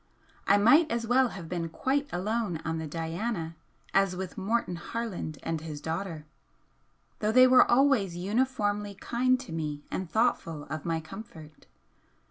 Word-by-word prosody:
I 200 Hz, -, +6 dB
might 265 Hz, +11 st, +6 dB
as 235 Hz, 0 st, -1 dB
well 255 Hz, +2 st, +4 dB
have 190 Hz, -7 st, -8 dB
been 170 Hz, -1 st, -3 dB
quite 280 Hz, -, -1 dB
alone 200 Hz, -1 st, -1 dB
on 160 Hz, 0 st, -1 dB
the 160 Hz, -, -4 dB
'Diana' 165 Hz, +2 st, -3 dB, 0.4 s
as 195 Hz, -1 st, +3 dB
with 185 Hz, -1 st, -5 dB
Morton 205 Hz, -2 st, -1 dB
Harland 190 Hz, -5 st, -4 dB
and 165 Hz, -1 st, -2 dB
his 155 Hz, -2 st, -6 dB
daughter, 160 Hz, 0 st, -4 dB, 0.9 s
though 210 Hz, 0 st, +1 dB
they 255 Hz, +2 st, +8 dB
were 255 Hz, 0 st, +6 dB
always 240 Hz, -9 st, +3 dB
uniformly 205 Hz, 0 st, 0 dB
kind 255 Hz, +5 st, +1 dB
to 255 Hz, -, -10 dB
me 150 Hz, -2 st, -4 dB
and 185 Hz, -3 st, -3 dB
thoughtful 170 Hz, -9 st, 0 dB
of 155 Hz, -2 st, -4 dB
my 165 Hz, -1 st, -1 dB
comfort. 160 Hz, -4 st, -11 dB
195 Hz, 150 wpm, -29 LUFS, 165-235 Hz, 0.9 s, they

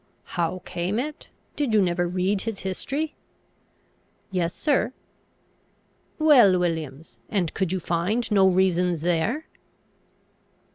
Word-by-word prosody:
"How 175 Hz, +1 st, -1 dB
came 180 Hz, +5 st, -2 dB
it? 295 Hz, +5 st, -4 dB, 0.3 s
Did 270 Hz, -7 st, 0 dB
you -, -, +6 dB
never 175 Hz, 0 st, 0 dB
read 185 Hz, +3 st, 0 dB
his 225 Hz, -3 st, -4 dB
history?" 280 Hz, -, -3 dB, 1.2 s
"Yes, 175 Hz, -2 st, -1 dB
sir." 285 Hz, -4 st, +1 dB, 1.2 s
"Well, 255 Hz, -, +6 dB
Williams, 160 Hz, -7 st, -3 dB
and 180 Hz, -6 st, -1 dB
could 190 Hz, -3 st, -1 dB
you 190 Hz, -, 0 dB
find 180 Hz, +8 st, -1 dB
no 195 Hz, -2 st, +5 dB
reasons 180 Hz, -3 st, +2 dB
there?" 180 Hz, -, 0 dB
185 Hz, 110 wpm, -25 LUFS, 175-225 Hz, 1.2 s, you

